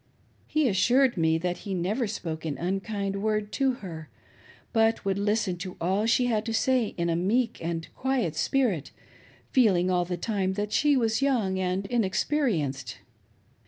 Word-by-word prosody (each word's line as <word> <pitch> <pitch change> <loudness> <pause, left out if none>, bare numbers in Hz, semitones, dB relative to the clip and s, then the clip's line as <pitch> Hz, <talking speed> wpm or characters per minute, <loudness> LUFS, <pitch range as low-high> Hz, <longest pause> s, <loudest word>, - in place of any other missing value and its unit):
He 310 -3 +2
assured 245 +6 +3
me 160 -2 +2
that 180 +1 -2
he 195 -3 -5
never 210 +7 -1
spoke 165 -6 -5
an 155 -3 -3
unkind 195 +2 -2
word 215 -1 -1
to 270 -2 +1
her, 160 -3 -8 0.6
but 225 -2 +2
would 195 0 0
listen 205 -3 0
to 180 +1 -7
all 190 +6 +1
she 240 +2 +3
had 220 -3 +1
to 225 - -1
say 250 -1 +1
in 170 -1 0
a 165 - +1
meek 215 +5 0
and 165 0 -3
quiet 255 - -1
spiriti 185 - 0 0.6
feeling 185 -8 +3
all 175 -1 +2
the 175 0 -3
time 190 -1 -1
that 205 +1 -3
she 290 +2 +3
was 225 0 +1
young 225 -9 +1
and 185 +1 -1
inexperienced. 190 - 0
200 Hz, 160 wpm, -27 LUFS, 175-230 Hz, 0.6 s, assured